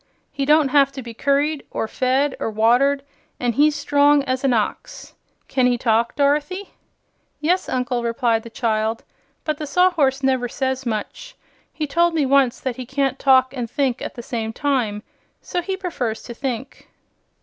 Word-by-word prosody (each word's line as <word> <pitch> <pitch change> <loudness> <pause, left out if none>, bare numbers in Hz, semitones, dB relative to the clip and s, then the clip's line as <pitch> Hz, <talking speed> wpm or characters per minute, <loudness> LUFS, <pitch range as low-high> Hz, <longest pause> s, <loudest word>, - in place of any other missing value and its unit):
He 275 - -2
don't 300 -1 +4
have 275 -1 +4
to 265 - -7
be 235 0 -8
curried, 280 +4 0
or 225 - -3
fed, 260 +4 0
or - - -2
watered, 245 +6 +3 0.4
an' 245 -1 0
he's 295 +4 +3
strong 290 0 +3
as 260 -1 -2
an 270 - +3
ox. 235 - -3 0.3
Can 255 -2 +2
he 245 -1 +2
talk, 230 0 +1
Dorothy?" 295 +7 0 0.7
"Yes, 355 +5 0
Uncle," 250 -1 -1
replied 230 -1 0
the 230 - -11
child. 225 -1 -1 0.4
"But 310 -1 -2
the 305 - -4
Sawhorse 285 -5 +2
never 260 -2 +1
says 265 0 -2
much. 220 - -5 0.4
He 310 - -3
told 340 +3 +2
me 300 -3 +2
once 265 -2 +3
that 255 -3 -4
he 255 - -6
can't 270 0 -1
talk 260 -1 +4
and 240 -3 -4
think 260 -2 -1
at - - -6
the 240 - -7
same 225 -2 -4
time, 240 -7 -1 0.4
so 355 - -3
he 380 +2 -3
prefers 260 - -3
to 240 - -8
think." 260 0 -5
265 Hz, 170 wpm, -21 LUFS, 240-290 Hz, 0.7 s, don't